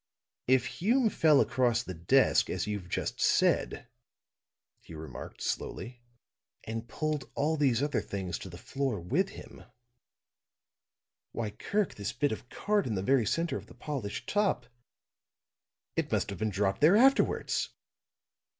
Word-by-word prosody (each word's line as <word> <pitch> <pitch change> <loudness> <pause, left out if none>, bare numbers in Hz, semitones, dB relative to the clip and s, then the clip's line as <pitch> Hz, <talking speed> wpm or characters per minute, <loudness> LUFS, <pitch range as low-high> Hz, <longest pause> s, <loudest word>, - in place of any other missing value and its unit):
"If 130 -1 +4
Hume 225 - +1
fell 155 -3 +5
across 120 -2 +2
the 95 - -6
desk, 85 0 +3
as - - -1
you've 105 -4 -4
just - - -3
said," - - +2 0.9
he 80 - -12
remarked, 80 -4 -8
slowly, 120 0 -4 0.6
"and 115 +1 -5
pulled 155 -2 -2
all 155 +3 +1
these 135 -4 +2
other 145 0 0
things 95 -4 -4
to 95 - -8
the 85 - -9
floor 135 -1 -2
with 145 - 0
him - - -12 1.7
why, 110 -3 -3
Kirk, 200 - -1
this 100 0 -4
bit 145 - +1
of 110 +3 -6
card, 205 -4 0
in 110 - -1
the 95 - -2
very 125 -1 +3
center 165 0 0
of - - -10
the - - -15
polished 130 -9 -5
top, 205 - +1 1.3
it - - -1
must - - 0
have - - -7
dropped 100 +2 0
there 165 +7 +7
afterwards." 270 +4 +3
125 Hz, 140 wpm, -30 LUFS, 105-155 Hz, 1.7 s, there